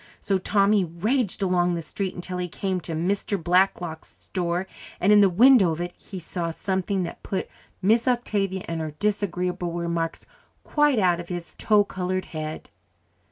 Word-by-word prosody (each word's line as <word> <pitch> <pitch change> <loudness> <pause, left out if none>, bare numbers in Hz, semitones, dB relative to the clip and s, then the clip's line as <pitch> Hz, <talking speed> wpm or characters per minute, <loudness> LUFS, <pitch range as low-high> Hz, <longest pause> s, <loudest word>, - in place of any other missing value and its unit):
So 195 -2 0
Tommy 200 +1 +3
raged 200 +6 -1
along 180 -2 +2
the 165 - -4
street 190 +4 -4
until 180 0 -5
he 180 - -2
came 185 +1 -2
to 165 - -6
Mr. 195 +5 -1
Blacklock's 175 -2 0
store, 175 0 -2 0.3
and 195 - +3
in 210 0 +7
the 200 - +6
window 215 -1 +6
of 160 - -6
it 175 0 -4
he 190 - -9
saw 170 0 -3
something 190 +2 -1
that 170 - -6
put 190 - -3 0.4
Miss 225 +5 +3
Octavia 200 -6 0
and 165 -1 -3
her 155 -2 -5
disagreeable 180 -3 -1
remarks 170 -1 -2 0.4
quite 295 -3 +2
out 180 -4 +3
of 175 - -8
his 175 -1 -5
tow 210 -1 +4
coloured 185 -1 -3
head. 155 0 -5
185 Hz, 165 wpm, -25 LUFS, 170-200 Hz, 0.4 s, in